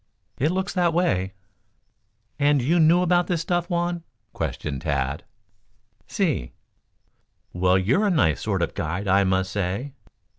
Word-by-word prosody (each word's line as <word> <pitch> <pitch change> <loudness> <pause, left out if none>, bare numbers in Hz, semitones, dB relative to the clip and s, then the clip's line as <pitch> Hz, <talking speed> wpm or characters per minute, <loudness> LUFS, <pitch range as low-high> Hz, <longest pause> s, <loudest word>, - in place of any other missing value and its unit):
"It 150 - +2
looks 190 +1 -2
that 175 -3 +1
way." 95 - +1 1.1
"And 145 0 +3
you 155 +8 +2
knew 165 +3 +5
about 175 0 +2
this 175 -4 0
stuff, 175 0 -1
Juan?" 175 -1 -1 0.3
questioned 70 -3 -4
Tad. 70 -1 -2 0.8
"Si." - - -1 1.0
"Well, 90 +1 +3
you're 130 - +2
a - - +2
nice 95 - +2
sort 95 -5 -1
of - - -2
a - - -32
guide, 85 +5 -3
I 95 +1 +4
must 95 0 0
say." 100 +8 -3
125 Hz, 145 wpm, -24 LUFS, -, 1.1 s, knew